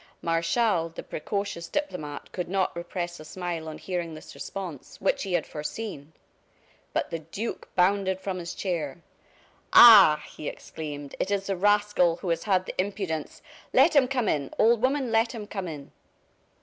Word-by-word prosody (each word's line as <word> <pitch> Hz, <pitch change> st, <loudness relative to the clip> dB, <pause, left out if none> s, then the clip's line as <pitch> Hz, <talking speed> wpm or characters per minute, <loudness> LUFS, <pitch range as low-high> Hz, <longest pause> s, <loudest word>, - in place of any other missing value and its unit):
Martial, 165 Hz, +2 st, +1 dB
the 165 Hz, -, -8 dB
precocious 200 Hz, 0 st, -4 dB
diplomat, 155 Hz, -, -4 dB
could 180 Hz, -2 st, -4 dB
not 190 Hz, -2 st, 0 dB
repress 175 Hz, 0 st, -4 dB
a -, -, -9 dB
smile 170 Hz, -1 st, -5 dB
on 155 Hz, -, -7 dB
hearing 175 Hz, -3 st, -4 dB
this 155 Hz, -, -11 dB
response, 180 Hz, -8 st, -7 dB
which 195 Hz, -, +1 dB
he 195 Hz, -3 st, -3 dB
had 175 Hz, -3 st, +1 dB
foreseen. 155 Hz, -1 st, -6 dB, 0.8 s
But -, -, -2 dB
the 165 Hz, -, -2 dB
duke 180 Hz, +9 st, -6 dB
bounded 190 Hz, +1 st, +2 dB
from 190 Hz, -1 st, -4 dB
his 170 Hz, -1 st, -6 dB
chair. 170 Hz, -4 st, -3 dB, 0.7 s
"Ah!" 195 Hz, -10 st, +9 dB
he 150 Hz, -, -8 dB
exclaimed, 145 Hz, -3 st, -8 dB
"it -, -, -1 dB
is 200 Hz, -1 st, 0 dB
the 195 Hz, -, -1 dB
rascal 205 Hz, -3 st, +3 dB
who 180 Hz, +1 st, -5 dB
has 165 Hz, -, -1 dB
had 185 Hz, -3 st, +2 dB
the -, -, -5 dB
impudence 185 Hz, -6 st, -4 dB, 0.3 s
Let 330 Hz, -, +5 dB
him 270 Hz, -3 st, +6 dB
come 250 Hz, -4 st, 0 dB
in, 140 Hz, -5 st, 0 dB
old 225 Hz, 0 st, +4 dB
woman, 265 Hz, -1 st, +1 dB
let 225 Hz, +2 st, +2 dB
him 220 Hz, -3 st, -6 dB
come 195 Hz, -3 st, -5 dB
in." 145 Hz, -4 st, -8 dB
180 Hz, 165 wpm, -27 LUFS, 160-205 Hz, 0.8 s, Ah